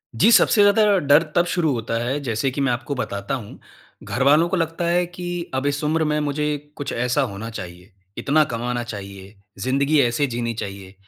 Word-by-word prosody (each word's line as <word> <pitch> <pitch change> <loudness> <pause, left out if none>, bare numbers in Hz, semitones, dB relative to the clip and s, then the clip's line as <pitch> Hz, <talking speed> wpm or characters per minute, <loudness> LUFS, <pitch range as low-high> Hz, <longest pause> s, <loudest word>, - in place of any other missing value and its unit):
जी, 220 - +5
सबसे 210 - +5
ज़्यादा 205 0 +5
डर 145 +3 +6
तब 175 - +4
शुरू 165 -5 +1
होता 115 -1 -4
है, 135 +4 -1
जैसे 120 +2 -1
कि 140 - -3
मैं 135 -2 +2
आपको 120 +4 -3
बताता 100 0 -3
हूँ, 110 -5 -9 0.4
घरवालों 145 +6 +3
को 190 - 0
लगता 165 +1 -2
है 175 +1 +2
कि, 175 0 -6
अब 130 +1 -1
इस 145 +1 -1
उम्र 160 +2 +1
में 150 0 0
मुझे 150 0 -1 0.3
कुछ 145 - -5
ऐसा 125 +4 0
होना 110 +4 -6
चाहिए, 90 -2 -9 0.3
इतना 155 +2 +3
कमाना 120 +1 -2
चाहिए, 100 -2 -9 0.2
ज़िन्दगी 140 +6 +1
ऐसे 125 +4 +1
जीनी 115 -1 -2
चाहिए। 100 -3 -7
135 Hz, 190 wpm, -22 LUFS, 115-155 Hz, 0.4 s, डर